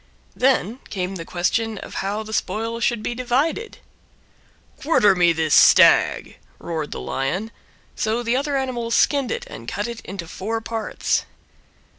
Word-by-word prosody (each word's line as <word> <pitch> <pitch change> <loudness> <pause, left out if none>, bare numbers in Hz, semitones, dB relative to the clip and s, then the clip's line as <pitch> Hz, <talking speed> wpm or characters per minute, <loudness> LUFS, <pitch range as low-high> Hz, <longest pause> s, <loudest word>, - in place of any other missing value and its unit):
Then 250 -3 +1
came 190 -1 -3
the 165 - -7
question 215 +6 -1
how 205 +3 -3
the 220 0 -8
spoil 225 +2 -2
should 235 -2 0
be - - -2
divided. 265 - -1 1.0
"Quarter 210 -10 +4
me 175 -2 +4
this 160 -2 0
Stag," - - +5 0.2
roared 160 -3 -4
the - - -6
Lion; 135 - -3 0.4
so 225 +2 -1
the 235 +1 0
other 280 +1 0
animals 240 -3 -2
skinned 280 -4 +2
it - - -3
and 115 - -10
cut 205 - -3
it 235 -1 -7
into 185 -3 -7
four 220 +6 -3
parts. 225 -1 -2
220 Hz, 145 wpm, -22 LUFS, 185-240 Hz, 1.0 s, Stag